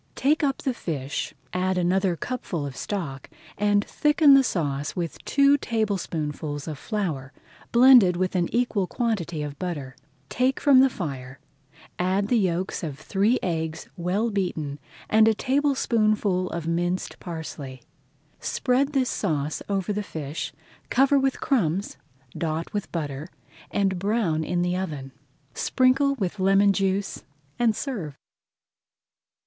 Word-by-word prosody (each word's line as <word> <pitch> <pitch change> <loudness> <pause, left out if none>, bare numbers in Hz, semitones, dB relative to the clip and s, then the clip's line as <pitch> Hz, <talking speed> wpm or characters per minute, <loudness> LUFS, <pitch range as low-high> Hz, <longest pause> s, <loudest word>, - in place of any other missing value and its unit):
Take 300 +4 +2
up 275 -2 0
the 265 - 0
fish, 145 - -4 0.2
add 185 +1 0
another 180 +1 +2
cupful 175 - -4
of 135 -2 -6
stock, 150 -10 -4 0.3
and 205 0 +2
thicken 295 -1 +4
the 275 0 +7
sauce 145 - -2
with 170 -2 -4
two 280 +1 +4
tablespoonfuls 160 - -2
of 150 -4 -5
flour, 160 - -3 0.4
blended 240 -7 +7
with 185 +1 -1
an 175 -2 +1
equal 230 -6 +1
quantity 175 -11 -2
of 145 -1 -7
butter. 145 -8 -4 0.3
Take 255 - +1
from 280 -3 +6
the 265 +1 +6
fire, 135 - -6 0.6
add 190 +3 +1
the 245 - +4
yolks 185 -1 -1
of 150 -6 -5
three 200 - +1
eggs 160 -2 -3
well 190 +6 0
beaten 160 -8 -2 0.3
and 220 0 +5
a 220 - +4
tablespoonful 220 -8 +1
of 170 -1 -4
minced 175 +2 -1
parsley. 150 -7 -7 0.6
Spread 270 +3 0
this 265 -2 +2
sauce 155 -6 -1
over 195 0 0
the 210 - -1
fish, 155 -5 -5 0.4
cover 275 +2 +4
with 270 -1 0
crumbs, 200 - 0 0.4
dot 160 0 -3
with 205 -2 -3
butter, 150 -2 -4 0.4
and 195 -2 0
brown 195 -6 0
in 175 +2 0
the 180 0 0
oven. 150 -8 -4 0.4
Sprinkle 270 +2 +2
with 200 -4 -3
lemon 195 +1 +4
juice 195 0 -1 0.4
and 230 -3 +3
serve. 195 - -4
190 Hz, 135 wpm, -25 LUFS, 160-230 Hz, 0.6 s, the